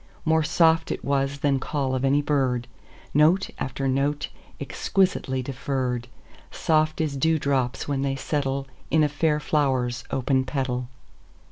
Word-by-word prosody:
More 160 Hz, 0 st, +3 dB
soft 160 Hz, +1 st, +3 dB
it -, -, -4 dB
was 140 Hz, 0 st, 0 dB
than 140 Hz, -2 st, +2 dB
call 135 Hz, -1 st, -2 dB
of 130 Hz, 0 st, -1 dB
any 140 Hz, +2 st, +3 dB
bird, 130 Hz, -5 st, 0 dB, 0.5 s
Note 160 Hz, +6 st, +4 dB
after 135 Hz, +1 st, -2 dB
note, 140 Hz, +3 st, 0 dB, 0.3 s
exquisitely 160 Hz, -9 st, 0 dB
deferr'd, 130 Hz, -2 st, -2 dB, 0.4 s
Soft 155 Hz, -1 st, +1 dB
as 155 Hz, -3 st, 0 dB
dew 160 Hz, +4 st, +2 dB
drops 135 Hz, -4 st, -1 dB
when 140 Hz, -2 st, -1 dB
they 135 Hz, 0 st, 0 dB
settleIn 135 Hz, -1 st, -2 dB, 0.4 s
a -, -, +4 dB
fair 150 Hz, +1 st, +1 dB
flower's 130 Hz, -5 st, 0 dB
open 130 Hz, 0 st, +1 dB
petal. 130 Hz, -2 st, -2 dB
140 Hz, 135 wpm, -25 LUFS, 130-150 Hz, 0.5 s, Note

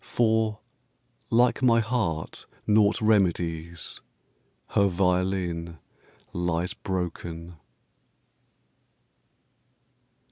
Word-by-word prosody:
For, 110 Hz, -2 st, +1 dB, 0.7 s
like 120 Hz, +3 st, +3 dB
my 115 Hz, -3 st, +5 dB
heart 110 Hz, -9 st, -2 dB, 0.2 s
naught 105 Hz, -1 st, +4 dB
remedies, 85 Hz, -5 st, 0 dB, 0.7 s
Her 100 Hz, -, +3 dB
violin 90 Hz, -2 st, 0 dB, 0.6 s
lies 85 Hz, 0 st, -1 dB
broken. 85 Hz, -2 st, -5 dB
90 Hz, 60 wpm, -26 LUFS, 85-110 Hz, 0.7 s, my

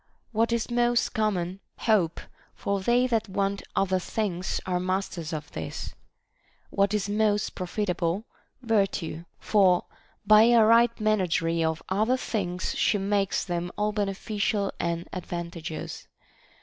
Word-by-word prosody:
What 230 Hz, +1 st, +1 dB
is 235 Hz, +1 st, -1 dB
most 240 Hz, 0 st, +2 dB
common? 190 Hz, -4 st, -1 dB, 0.2 s
Hope; 195 Hz, -8 st, +2 dB, 0.4 s
for 200 Hz, 0 st, -1 dB
they 240 Hz, +6 st, +3 dB
that 225 Hz, -4 st, 0 dB
want 195 Hz, +1 st, -1 dB
other 190 Hz, -1 st, +2 dB
things 185 Hz, -2 st, -2 dB
are 180 Hz, -1 st, 0 dB
masters 185 Hz, -3 st, -2 dB
of 150 Hz, -2 st, -5 dB
this. 80 Hz, -, -5 dB, 0.8 s
What 200 Hz, +1 st, +2 dB
is 205 Hz, -1 st, -1 dB
most 210 Hz, 0 st, +1 dB
profitable 185 Hz, 0 st, -2 dB, 0.2 s
% -, -, -44 dB
Vir 220 Hz, -4 st, +3 dB
tue; 165 Hz, -2 st, -5 dB
for 190 Hz, -4 st, +3 dB, 0.4 s
by 215 Hz, +1 st, +8 dB
a 235 Hz, -2 st, +6 dB
right 230 Hz, +1 st, +5 dB
managery 180 Hz, -6 st, +1 dB
of 160 Hz, 0 st, -1 dB
other 215 Hz, +7 st, +2 dB
things 185 Hz, -7 st, -2 dB
she 210 Hz, -, +2 dB
makes 200 Hz, 0 st, 0 dB
them 175 Hz, -1 st, -3 dB
all 210 Hz, 0 st, +1 dB
beneficial 205 Hz, 0 st, -1 dB
and 170 Hz, 0 st, -2 dB
advantageous. 170 Hz, -3 st, -6 dB
195 Hz, 135 wpm, -27 LUFS, 175-215 Hz, 0.8 s, by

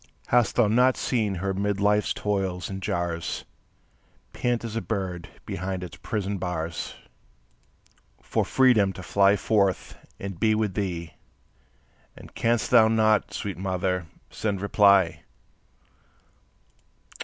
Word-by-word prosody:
Hast 120 Hz, -3 st, +3 dB
thou 120 Hz, -3 st, +4 dB
not 125 Hz, +4 st, +3 dB
seen 110 Hz, -6 st, 0 dB
her 95 Hz, +2 st, -2 dB
'mid 100 Hz, +1 st, -1 dB
life's 105 Hz, +1 st, +2 dB
toils 95 Hz, -3 st, -2 dB
and 95 Hz, 0 st, -5 dB
jars, 85 Hz, -2 st, -3 dB, 0.9 s
Pant 120 Hz, -1 st, -1 dB
as 115 Hz, -1 st, -5 dB
a 115 Hz, -, -1 dB
bird 95 Hz, -6 st, -4 dB, 0.2 s
behind 95 Hz, +1 st, -4 dB
its 90 Hz, -, -9 dB
prison 100 Hz, -2 st, -3 dB
bars, 85 Hz, -2 st, -4 dB, 1.2 s
For -, -, -1 dB
freedom 115 Hz, -7 st, +3 dB
to 95 Hz, -, -9 dB
fly 100 Hz, +2 st, +4 dB
forth 100 Hz, -3 st, 0 dB, 0.2 s
and 95 Hz, -3 st, -6 dB
be 110 Hz, +2 st, +3 dB
with 105 Hz, -3 st, 0 dB
thee? 85 Hz, -5 st, -3 dB, 1.0 s
And -, -, -13 dB
canst 115 Hz, -2 st, 0 dB
thou 115 Hz, -3 st, +7 dB
not, 110 Hz, -2 st, +2 dB
sweet 100 Hz, -5 st, -5 dB
mother, 90 Hz, -2 st, -1 dB, 0.2 s
send 100 Hz, -3 st, -2 dB
reply? 100 Hz, -3 st, +4 dB
100 Hz, 120 wpm, -26 LUFS, 90-110 Hz, 1.2 s, thou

